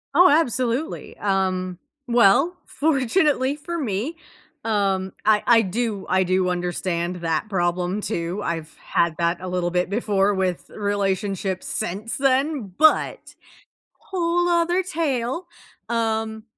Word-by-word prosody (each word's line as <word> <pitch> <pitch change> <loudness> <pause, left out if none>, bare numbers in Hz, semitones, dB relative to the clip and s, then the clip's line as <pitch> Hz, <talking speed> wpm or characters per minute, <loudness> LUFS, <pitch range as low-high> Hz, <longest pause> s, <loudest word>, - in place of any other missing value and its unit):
Oh, 360 +1 +8
absolutely, 260 -1 0
um, 185 -2 -1 0.3
well, 245 - +4
fortunately 285 -1 +1
for 340 +3 -5
me, 265 - -2 0.5
um, 195 -3 0
I 210 0 +3
I 230 -1 +6
do 215 0 -2
I 185 +1 +3
do 185 0 +1
understand 175 0 -2
that 165 +2 -1
problem, 180 +1 -1
too. 175 +2 -3
I've 160 -2 -4
had 170 -2 +1
that 170 +1 +1
a 185 - -6
little 180 -1 -1
bit 180 +1 0
before 205 -2 +1
with 185 -6 -2
relationships 195 -2 -1
since 205 +6 -3
then, 270 - +1
but, 315 0 +2 0.6
whole 350 -1 0
other 345 +2 +2
tale, 310 -3 -2 0.4
um, 220 -1 -1
205 Hz, 120 wpm, -23 LUFS, 185-270 Hz, 0.6 s, Oh